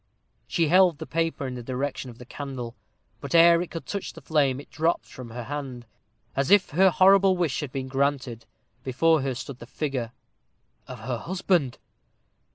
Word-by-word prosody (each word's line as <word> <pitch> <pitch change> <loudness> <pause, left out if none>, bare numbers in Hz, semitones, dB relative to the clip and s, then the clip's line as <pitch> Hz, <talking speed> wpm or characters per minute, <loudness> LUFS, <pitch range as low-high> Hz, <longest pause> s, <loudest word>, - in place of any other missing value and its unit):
She 165 -3 +1
held 180 -1 +5
the - - -7
paper 165 -3 -1
in 130 - -4
the 125 - -6
direction 130 +2 -4
of 120 - -12
the 125 - -11
candle; 130 -3 -6 0.5
but, 140 +2 -4
ere 170 0 +7
it 175 - -5
could 165 - -7
touch 200 -2 -5
the 165 - -12
flame, 140 -3 +1
it 145 - -13
dropped 160 +2 0
from 125 -2 -10
her 120 +1 -6
hand. 130 -2 -6 0.5
As 135 0 0
if 205 -1 +5
her 190 +6 +5
horrible 190 +2 +5
wish 170 -6 0
had 150 -4 -5
been 130 0 -4
granted, 135 -3 -1 0.4
before 155 +4 +2
her 135 -1 -2
stood 125 +1 -7
the 120 - -11
figure 130 -4 -3 0.8
of 125 -3 -9
her 120 0 -3
husband! 175 - 0
140 Hz, 180 wpm, -26 LUFS, 130-165 Hz, 0.8 s, ere